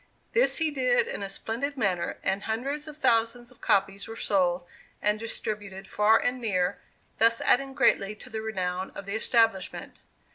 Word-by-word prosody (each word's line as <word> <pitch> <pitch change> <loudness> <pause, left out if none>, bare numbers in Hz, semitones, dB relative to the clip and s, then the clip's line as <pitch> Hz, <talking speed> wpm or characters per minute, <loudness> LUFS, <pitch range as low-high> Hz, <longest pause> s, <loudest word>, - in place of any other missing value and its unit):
This - - +4
he 320 -2 +1
did 255 -3 +2
in - - -5
a 200 - -4
splendid 255 +8 -3
manner, 190 -7 0
and 195 - 0
hundreds 275 +8 -3
of 305 -1 -9
thousands 240 -2 +1
of 250 - -21
copies 195 0 +1
were 225 - -7
sold 180 -4 +1 0.3
and 210 +1 +1
distributed 205 -3 -5
far 210 +2 +4
and 250 +2 -1
near, 185 -4 0 0.4
thus 230 +1 +4
adding 270 +1 +2
greatly 210 -6 +2
to - - -13
the 220 0 -3
renown 185 -4 -2
of 200 - -7
the 200 - -5
establishment. 220 -3 +1
220 Hz, 170 wpm, -27 LUFS, 195-245 Hz, 0.4 s, This